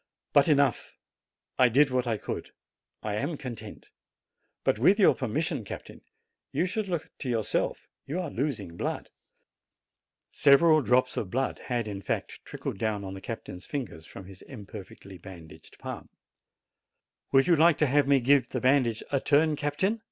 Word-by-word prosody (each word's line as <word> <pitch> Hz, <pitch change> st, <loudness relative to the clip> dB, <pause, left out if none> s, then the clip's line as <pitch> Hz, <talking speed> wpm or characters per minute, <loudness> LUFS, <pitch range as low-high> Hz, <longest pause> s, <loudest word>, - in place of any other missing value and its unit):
But 145 Hz, -, +5 dB
enough! 140 Hz, -5 st, +1 dB, 0.6 s
I 125 Hz, -1 st, +6 dB
did 135 Hz, +3 st, +4 dB
what 125 Hz, -1 st, 0 dB
I 115 Hz, -2 st, 0 dB
could. -, -, -5 dB, 0.5 s
I 105 Hz, -, -2 dB
am 145 Hz, +6 st, -2 dB
content. 115 Hz, -6 st, -9 dB, 0.7 s
But, -, -, +1 dB
with 190 Hz, -, +4 dB
your 200 Hz, -, +6 dB
permission, 135 Hz, +2 st, -2 dB
captain, -, -, -9 dB, 0.5 s
you 160 Hz, +6 st, +1 dB
should 205 Hz, +3 st, -2 dB
look 170 Hz, -4 st, -3 dB
to 130 Hz, -, -4 dB
yourself: 115 Hz, -3 st, -1 dB, 0.2 s
you 160 Hz, +6 st, -2 dB
are 175 Hz, -5 st, -4 dB
losing 110 Hz, -, -3 dB
blood." -, -, -4 dB, 1.2 s
Several 155 Hz, +3 st, +5 dB
drops 125 Hz, 0 st, +2 dB
of 95 Hz, -, -2 dB
blood 130 Hz, +5 st, -1 dB
had 120 Hz, -3 st, -1 dB
in 100 Hz, -2 st, -5 dB
fact -, -, -3 dB
trickled -, -, -6 dB
down 105 Hz, -2 st, -1 dB
on 95 Hz, -1 st, -6 dB
the 95 Hz, -, -8 dB
captain's 95 Hz, -5 st, -7 dB
fingers 105 Hz, -, -5 dB
from 95 Hz, -, -10 dB
his 95 Hz, 0 st, -12 dB
imperfectly 100 Hz, -5 st, -11 dB
ban 90 Hz, -3 st, -11 dB
daged 80 Hz, -, -16 dB
palm. -, -, -7 dB, 1.2 s
"Would 135 Hz, 0 st, +5 dB
you 175 Hz, -, +5 dB
like 165 Hz, 0 st, +5 dB
to 150 Hz, -, +3 dB
have 145 Hz, +1 st, +2 dB
me 140 Hz, -2 st, +4 dB
give 135 Hz, 0 st, +4 dB
the -, -, -2 dB
bandage 130 Hz, -4 st, +2 dB
a 140 Hz, -, +2 dB
turn, 150 Hz, +3 st, +3 dB
captain? 150 Hz, +10 st, -1 dB
130 Hz, 165 wpm, -28 LUFS, 105-145 Hz, 1.2 s, I